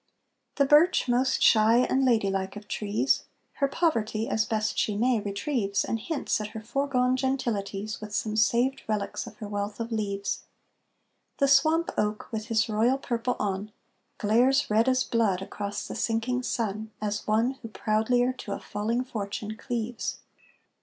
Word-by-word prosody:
The 280 - +3
birch, 300 +2 +5
most 250 +2 +2
shy 220 +1 +6
and 265 +1 +2
lady 225 -6 +3
like 195 0 -2
of 210 0 -9
trees, 210 +6 0 0.3
Her 275 - +2
poverty, 230 -8 0
as 220 0 +1
best 215 -1 -1
she 210 -2 0
may, 240 +1 +2
retrieves, 200 0 -1
And 225 - -2
hints 280 -2 -1
at 210 - -3
her - - -3
foregone 250 +2 +1
gentilities 215 -6 -2
With 215 -1 -7
some 215 -1 -1
saved 235 +5 +2
relics 215 +2 -2
of 215 - -10
her 215 -4 -6
wealth 205 +1 -4
of 230 0 -4
leaves; 200 -3 -2 1.0
The 275 - +3
swamp 315 +5 +4
oak, 210 0 -1
with 220 -1 -4
his 220 -2 +2
royal 225 +4 +2
purple 245 -2 -2
on, 200 +1 -2 0.5
Glares 245 +5 +3
red 225 +4 +4
as 255 0 +2
blood 220 -6 +1
across 200 +1 -5
the - - -6
sinking 235 +2 0
sun, 220 -3 -2
As 210 0 -3
one 225 +4 +2
who 230 - -6
proudlier 225 +3 +1
to 200 - -4
a - - -4
falling 225 +4 -2
fortune 215 -3 -5
cleaves. 235 0 -3
225 Hz, 160 wpm, -27 LUFS, 210-250 Hz, 1.0 s, shy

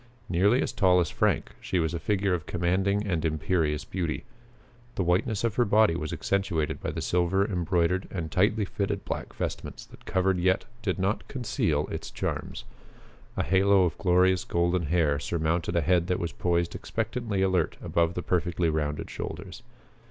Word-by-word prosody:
Nearly 100 +8 +3
as - - -2
tall 90 -3 +4
as 85 - 0
Frank, - - +1
she 95 - -1
was 80 -1 0
a 85 - -2
figure 100 -1 0
of 85 -4 -3
commanding 95 +4 +1
and 85 -6 -1
imperious 80 -1 0
beauty. 85 -4 -3 0.7
The 95 - 0
whiteness 95 +6 +1
of 115 -3 +1
her 120 - +5
body 105 -4 +4
was 75 -2 -3
accentuated 85 -1 -1
by - - -2
the - - -4
silver 90 +3 +2
embroidered 90 -1 0
and 80 -5 -4
tightly 105 +4 +2
fitted 100 +1 -3
black - - -4
vestments - - -5
that - - -17
covered 95 0 +1
yet 95 +1 +2 0.2
did 100 -5 -1
not 95 +3 -1
conceal 85 - -1
its - - -5
charms. - - -4 0.7
A - - +1
halo 95 0 +4
of 85 -3 0
glorious 90 0 +3
golden 85 -1 0
hair 75 -3 +2
surmounted 85 +2 -1
a 85 - +3
head 85 +2 +2
that 90 - +1
was 85 - -3
poised 85 -1 0
expectantly 110 -3 -2
alert 95 -4 +1
above 85 0 0
the 90 - -3
perfectly 85 -1 0
rounded 75 -1 -2
shoulders. - - -7
90 Hz, 170 wpm, -27 LUFS, 85-95 Hz, 0.7 s, her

